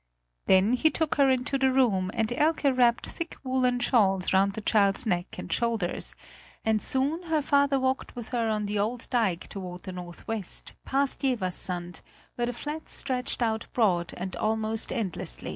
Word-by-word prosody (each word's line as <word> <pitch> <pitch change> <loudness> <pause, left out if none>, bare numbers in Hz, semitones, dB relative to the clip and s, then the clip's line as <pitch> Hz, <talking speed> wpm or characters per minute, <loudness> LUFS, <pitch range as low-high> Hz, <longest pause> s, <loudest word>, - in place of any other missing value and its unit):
Then 190 +5 +5
he 315 +5 +4
took 315 0 -1
her 275 -2 +5
into 260 +2 +1
the 265 0 +3
room 215 -8 +2
and 225 0 0
Elke 295 -1 +2
wrapped 240 -2 +3
thick 335 -1 -6
woolen 255 -1 +1
shawls 195 -8 +2
round 195 +1 +3
the 220 - -5
child's 200 0 +3
neck 175 -4 -1
and - - -4
shoulders; 230 -6 -1 0.5
and 220 -1 +2
soon 280 +6 0
her 310 -2 +2
father 280 -1 +3
walked 260 +1 -1
with 240 -2 -7
her 235 -3 0
on 210 -1 0
the 205 0 -1
old 230 +4 -2
dike 215 -9 +1
toward 180 -3 -7
the 185 - -6
northwest, 180 +3 -5
past 275 0 +1
Jeverssand, 180 - -2 0.3
where 240 0 -1
the 245 - -2
flats 300 +6 -5
stretched 255 -2 -1
out 220 -1 -1
broad 180 -8 +1
and 185 +1 -5
almost 220 0 0
endless. 190 - -1
230 Hz, 170 wpm, -27 LUFS, 195-260 Hz, 0.5 s, Then